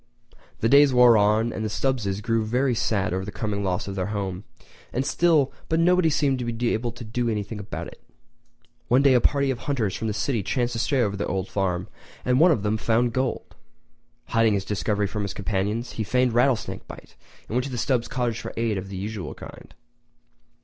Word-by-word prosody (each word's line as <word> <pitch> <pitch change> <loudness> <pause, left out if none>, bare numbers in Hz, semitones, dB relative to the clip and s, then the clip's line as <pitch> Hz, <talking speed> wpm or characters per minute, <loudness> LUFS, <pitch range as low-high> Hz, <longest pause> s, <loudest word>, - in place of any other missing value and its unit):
The 115 - +3
days 140 +1 +6
wore 125 -1 +7
on, 110 +2 +3
and 110 - -4
the 110 - -1
Stubbses 105 -5 -1
grew 115 -1 +1
very 125 +4 +1
sad 100 -5 0
over 95 +1 -2
the 105 - -6
coming 100 -1 -3
loss 90 -1 -1
of 100 - -4
their 95 -1 -2
home 100 -2 -4 0.5
and 130 +2 -1
still 155 -5 +2 0.2
but 160 - +2
nobody 180 0 +4
seemed 140 -4 +1
able 120 0 -1
to 120 0 -9
do 120 +2 -2
anything 105 0 -3
about 100 - -6
it. - - -12 0.9
One 130 +3 +4
day 140 -2 +6
a 125 - +4
party 140 +1 +2
of 125 - -4
hunters 120 -9 -1
from 110 - -3
the 105 - -1
city 120 -2 0
chanced 120 +5 -1
to 115 - -3
stray 130 +1 +1
over 100 -2 -1
the 100 - -3
old 95 0 -2
farm, 95 -1 -1 0.4
and 125 +1 +3
one 175 +3 +7
of 120 - +1
them 105 +1 +1
found 115 +2 +1
the - - -11
gold!! 130 -1 -2 0.8
Hiding 115 -1 +3
his 100 -1 -2
discovery 105 0 -1
from 105 +1 -3
his 100 -1 -4
companions, 105 +4 -2
he 110 - -3
feigned 125 +3 +1
rattlesnake 125 0 +1
bite - - -12 0.3
and - - -12
went 125 +1 +1
to - - -5
the 125 - -4
Stubbs' 120 0 0
cottage 125 -3 -2
for - - -7
aid 115 -3 0
of 95 +1 -8
the 95 - -6
usual 100 -4 -5
kind. - - -12
115 Hz, 210 wpm, -24 LUFS, 105-125 Hz, 0.9 s, wore